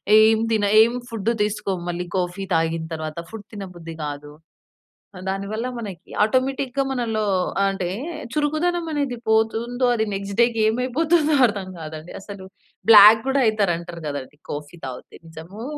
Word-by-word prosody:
ఏం 220 0 +6
తిన 215 -2 +2 0.2
ఏం 230 - +4 0.2
ఫుడ్ 225 -1 -2
తీసుకోము 200 -3 -1
మళ్ళీ 175 +1 -3
కాఫీ 180 +1 -2
తాగిన 165 0 +1
తరువాత 155 0 -5
ఫుడ్ 220 -2 -9
తినబుద్ధి 180 -5 -8
కాదు. 145 0 -6 1.0
దానివల్ల 200 +4 -3
మనకి 200 -7 -8
ఆటోమేటిక్‌గా 260 +3 0
మనలో 225 -4 -1 0.4
ఆహ్, 195 - +3
అంటే 190 -2 -3 0.5
చురుకుదనం 325 +3 0
అనేది 280 -4 -1
పోతుందో 230 +3 +1
అది 220 -1 0
నెక్స్ట్ 200 +1 -5
డే‌కి 235 -2 +2
ఏమైపోతుందో 295 +6 +2
అర్థం 200 -3 -5
కాదండి 155 +1 -8
అసలు. 195 -1 -9 0.4
బ్లాక్ 215 +1 +10
కూడా 270 0 +2
అయితారు 210 -4 +2
అంటారు 170 -1 -9
కదండి! 145 0 -7
కాఫీ 150 +3 -7
తాగితే 130 -1 -9
నిజమో? 165 +7 -10
210 Hz, 135 wpm, -22 LUFS, 175-235 Hz, 1.0 s, బ్లాక్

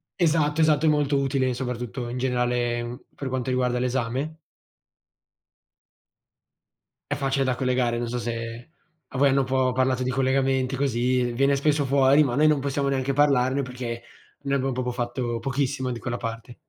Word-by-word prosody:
esatto, 155 -3 +2
esatto, 155 0 +3
è - - +5
molto 145 -2 +2
utile 135 -2 0
soprattutto 125 -1 -4
in 125 - -4
generale, 125 -1 0
mhmm, 120 +1 -6 0.2
per 140 - -5
quanto 130 0 -2
riguarda 125 -1 +1
l'esame. 130 +5 -2 2.7
È - - +2
facile 135 -1 0
da 130 -1 0
collegare, 125 -2 0
non 120 0 -2
so 125 +1 -3
se 115 +2 -5 0.4
a 130 - -6
voi 140 +1 +5
hanno 135 0 +3
un - - -1
po' 130 -1 +1
parlato 130 0 +1
di 130 - -1
collegamenti 130 0 +1
così, 125 -2 +1
viene 140 +2 +2
spesso 145 0 +2
fuori 140 +2 +4
ma 125 -3 -1
noi 155 +2 +4
non 150 -2 +3
possiamo 140 0 -1
neanche 135 0 0
parlarne 135 -1 +2
perché 125 -2 -5 0.4
noi 140 - -1
abbiamo 135 0 0
proprio 125 0 -2
fatto 120 -1 -3
pochissimo 130 +1 -1
di 120 - -5
quella 120 0 -3
parte. 115 +1 -6
130 Hz, 170 wpm, -25 LUFS, 125-140 Hz, 2.7 s, è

